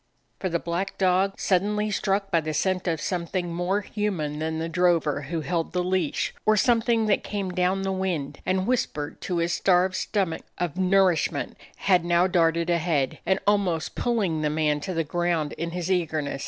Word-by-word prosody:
For 185 - -1
the 170 - +1
black 170 +4 -3
dog, 190 +1 +2
suddenly 210 +3 +1
struck 195 0 0
by 165 - +3
the 155 0 -3
scent 185 +3 0
of 165 -2 0
something 175 -1 -2
more 180 +4 0
human 185 -9 -3
than 160 0 -2
the 165 +1 -2
dro 175 +1 +3
ver 150 -3 -2
who 165 -2 -2
held 165 0 -2
the 180 -1 0
leash, 180 -4 0
or 215 0 +3
something 235 -1 +3
that 210 -2 +2
came 200 -3 -3
down 185 +2 0
the 195 - -1
wind 175 -7 -2
and 185 0 0
whispered 175 -12 -2
to 180 - -2
his 170 0 0
starved 185 0 +3
stomach 185 -4 -1 0.2
of 175 -4 -2
nourishment, 185 -3 +2 0.2
had 180 -3 +2
now 175 +1 +3
darted 170 -2 +2
ahead, 160 -6 0 0.3
almost 195 -6 +1
pulling 200 -10 0
the 150 - +1
man 150 -1 +1
to 185 +4 -5
the 165 - +1
ground 170 -1 -1
in 170 +1 -4
his 175 +1 -3
eagerness. 155 -6 -1
180 Hz, 180 wpm, -25 LUFS, 165-195 Hz, 0.3 s, by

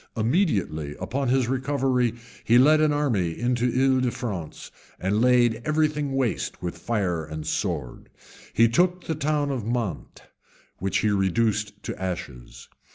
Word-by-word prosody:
Immediately 110 - 0
on 135 +1 -2
his 130 -1 +2
recovery, 130 -2 0 0.3
he 120 - +4
led 155 +4 +6
an 155 -1 +3
army 115 - 0
into 120 +1 +1
L'Isle 130 +1 +3
de 125 - +1
France, 100 -10 -6 0.3
and 100 +4 0
laid 120 -2 +3
every 155 +2 +2
thing 150 -2 -3
waste 130 -4 -1
with 90 -1 -5
fire 95 -8 -1
and 80 0 -7
sword. 80 - -3 0.4
He 115 - +4
took 180 +9 +1
the 160 - -2
town 150 -1 0
of 130 -5 -3
Mante, 115 -8 -4 0.6
which 95 +2 0
he 105 - +2
reduced 105 +1 0
to - - -6
ashes. 60 -10 -6
120 Hz, 150 wpm, -25 LUFS, 95-135 Hz, 0.6 s, led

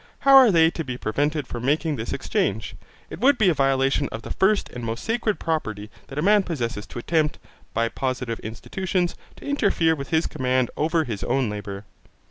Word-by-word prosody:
How 275 0 +6
are 260 -3 +9
they 165 -3 +5
to 165 - -4
be 130 -3 -5
prevented 145 +7 -1
from 120 -1 -6
making 150 +3 +1
this 115 -2 -5
exchange? 105 +2 -1 0.4
it - - -7
would 270 +4 +4
be 215 -5 +4
a - - +3
violation 135 0 +1
of 110 - -6
the - - -7
first 200 +2 +2
and 120 - -8
most 115 +1 -4
sacred 225 -4 0
property 110 -10 -3 0.2
that 135 - -9
a 150 - 0
man 205 +2 +5
possesses 120 - -4
to - - -10
attempt, 150 +4 0 0.4
by 115 +1 +2
positive 125 -2 -3
institutions, 175 - -2 0.2
to - - -13
interfere 200 -12 +2
with 140 -3 -6
his 160 -1 +2
command 130 -4 0
over 160 +1 +1
his 110 -8 -5
own 130 -5 0
labour. 100 -1 -6
145 Hz, 195 wpm, -24 LUFS, 120-170 Hz, 0.4 s, are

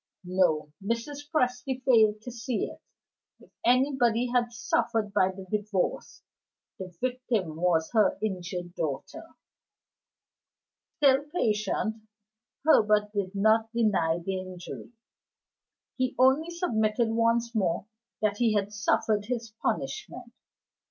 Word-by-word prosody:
(No: 175 -5 +1
Mrs. 280 +7 -3
Presty 255 -3 -1
failed 220 -4 +4
to 245 - -6
see 235 0 -2
it; - - -10 0.6
if - - -20
anybody 245 -2 +2
had 240 -1 +2
suffered 225 -2 -1
by 185 -3 +3
the 190 0 -8
Divorce, 205 -3 -2 0.6
the 190 - -5
victim 245 -9 -1
was 165 -1 +1
her 220 -3 +3
injured 180 -3 -4
daughter.) 170 - -4 1.7
Still 275 -3 +5
patient, 220 - -1 0.7
Herbert 210 -8 +4
did 200 -1 -2
not 220 +2 +3
deny 205 -8 +2
the 185 +2 -3
injury; 185 +3 -8 1.1
he 255 -1 -1
only 265 +6 +4
submitted 230 - 0
once 230 +1 +1
more 190 -5 0 0.4
that 205 -1 +1
he 225 -2 +2
had 205 0 -1
suffered 210 0 +1
his 230 -2 -4
punishment. - - -3
220 Hz, 110 wpm, -28 LUFS, 195-245 Hz, 1.7 s, Still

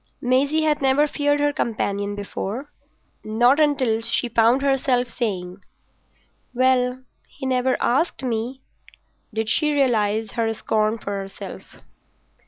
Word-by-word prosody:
Maisie 280 +5 +2
had 300 -2 +1
never 270 +2 +3
feared 290 -1 0
her 290 0 +1
companion 205 -4 -2
before. 205 +7 -5 0.5
Not 240 +6 +3
until 270 -7 +2
she 235 +2 0
found 235 +4 +3
herself 260 -3 +1
saying, 195 -6 -4 0.9
"Well, 255 0 +2 0.2
he 270 - -9
never 255 0 +1
asked 275 +4 0
me," 245 +2 -3 0.7
did 220 0 -2
she 300 +7 +2
realise 220 -6 +1
her 230 -2 0
scorn 215 0 0
of 230 - -13
herself. 195 -1 -7
245 Hz, 120 wpm, -22 LUFS, 220-270 Hz, 0.9 s, never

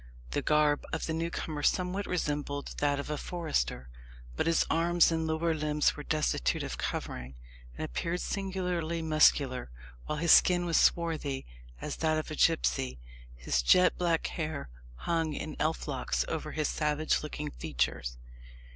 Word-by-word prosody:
The - - 0
garb 150 -1 +3
of - - -2
the 160 - -2
newcomer 160 -2 -3
somewhat 185 +6 0
resembled 145 -4 -2
that 145 -1 +1
of 140 - -4
a 150 - -2
forester; 145 - -2 0.5
but - - 0
his 165 - +3
arms 170 +1 +3
and 160 -1 0
lower 160 +1 +1
limbs 150 -1 +1
were 150 - -7
destitute 150 - 0
of - - -5
covering, 65 +1 -4 0.4
and - - -3
appeared 170 - -2
singularly 180 -5 -2
muscular, 145 - +3 0.4
while 150 - -2
his 165 +1 +3
skin 175 -1 +6
was 170 -1 +2
swarthy 155 -5 +1 0.3
as - - -5
that 155 -1 +1
of 155 - -4
a - - -3
gipsy. 65 - +2 0.4
His - - 0
jet 180 - +5
black 170 -2 +1
hair 155 - -4 0.3
hung 165 - -1
in 155 +1 -5
elf 155 +1 -1
locks 135 -3 -1
over 155 -1 -4
his 155 -2 0
savage 150 0 0
looking 150 -1 -5
features. - - -2
155 Hz, 155 wpm, -30 LUFS, 145-165 Hz, 0.5 s, skin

